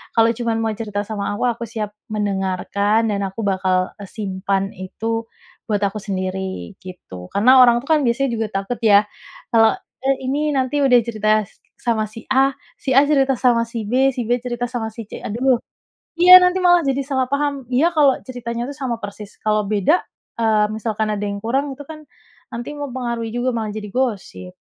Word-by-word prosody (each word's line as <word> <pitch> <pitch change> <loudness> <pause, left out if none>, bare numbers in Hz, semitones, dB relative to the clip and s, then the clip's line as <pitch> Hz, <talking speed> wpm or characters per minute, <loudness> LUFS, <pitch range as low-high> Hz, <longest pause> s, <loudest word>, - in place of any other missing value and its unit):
kalau 225 -1 +5
cuman 235 -2 -1
mau 225 - 0
cerita 210 -3 -3
sama 205 -2 -3
aku, 205 - -3
aku 235 0 -7
siap 215 -2 -4 0.2
mendengarkan 200 +2 0
dan 200 -1 -1
aku 195 +4 -7
bakal, 185 -2 0
eee, 200 - -8
simpan 195 -1 -2
itu 225 +5 -4 0.4
buat 205 -1 0
aku 200 +1 -1
sendiri." 190 - -4
gitu. 95 - -10
Karena 255 +6 +6
orang 240 -1 +5
itu, - - -14
kan, 310 - +5
biasanya 260 +3 +1
juga 225 -1 -1
takut, 195 +5 -3
ya, 205 -2 +6 0.5
kalau, 225 -1 +5 0.3
eh, 270 0 +2
ini, 295 +3 0
nanti 265 +2 0
udah 255 -3 +5
cerita 215 -2 -1 0.5
sama 225 -2 0
si 225 - -9
A, 270 +1 +4 0.3
si 265 - -3
A - - +9
cerita 275 -2 +3
sama 240 -2 +3
si 230 0 -5
B, 260 +4 +3
si 250 - -2
B 245 - +3
cerita 245 -1 -3
sama 240 -3 -3
si 230 - -7
C, - - -7
aduh 250 +4 +2 0.6
iya, 365 +1 +11
nanti 360 +1 +3
malah 350 -1 +6
jadi 270 0 +1
salah 265 -2 0
paham. 280 -2 -1
Iya 295 +7 +4
kalau 285 -3 +5
ceritanya, 240 -2 -4
tuh, 285 - -8
sama 260 -5 -2
persis. 205 0 -8
Kalau 215 -1 +1
beda, 215 - +2 0.4
eee, 215 -2 +3
misalkan 220 0 -2
ada 210 - -3
yang 200 0 -3
kurang 270 +5 -1
itu, 285 - -10
kan, 310 -1 -10 0.5
nanti 235 +4 -5
mempengaruhi 245 -5 -4
juga, 245 +1 0
malah 220 -2 -2
jadi 210 -1 -6
gosip. 200 - -3
230 Hz, 185 wpm, -20 LUFS, 205-260 Hz, 0.6 s, iya